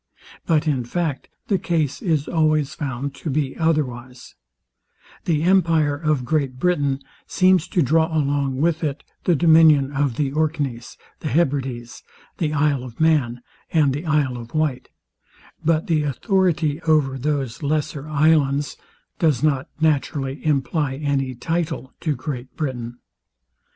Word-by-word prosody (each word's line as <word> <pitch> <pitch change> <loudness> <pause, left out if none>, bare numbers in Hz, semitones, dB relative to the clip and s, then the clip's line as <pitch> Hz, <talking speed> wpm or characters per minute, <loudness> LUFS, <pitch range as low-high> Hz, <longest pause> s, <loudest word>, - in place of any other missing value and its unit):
But 155 -2 +2
In 135 -5 +1
fact 150 +2 -3 0.2
the 195 -3 +1
case 160 -5 -1
is 160 -8 0
always 155 -3 +1
found 140 -1 -4
to 155 - -6
be 140 -1 -1
otherwise, 130 -6 -2 0.9
The 155 -3 +1
empire 165 -5 +3
of 150 -4 -1
Great 140 -3 -1
Britain 140 -4 0 0.2
seems 185 -2 +3
to 175 - +1
draw 160 +4 +3
along 140 -4 0
with 165 +1 +1
it 145 -3 -2 0.2
the 175 - +4
dominion 155 -3 +5
of 140 -3 0
the 140 0 -1
Orkneys, 145 -6 -2 0.2
the - - -5
Hebrides, 135 -6 -1 0.4
the 155 -3 0
isle 145 -3 +1
of 120 -3 -10
Man, 135 -7 +2 0.3
and 150 -5 +3
the 150 +5 -5
Isle 145 -5 +1
of 120 +4 -10
Wight; 155 -5 -1 0.7
but 160 0 +2
the 160 -3 +1
authority 160 - 0
over 150 -5 +2
those 140 -3 -2
lesser 150 0 -2
islands 145 -2 +2 0.4
does 150 -7 +2
not 140 -3 +1
naturally 145 -3 0
imply 145 -1 0
any 135 -2 -1
title 160 0 -3
to 155 -3 -1
Great 130 -1 -6
Britain. 120 -6 -4
145 Hz, 135 wpm, -22 LUFS, 135-160 Hz, 0.9 s, dominion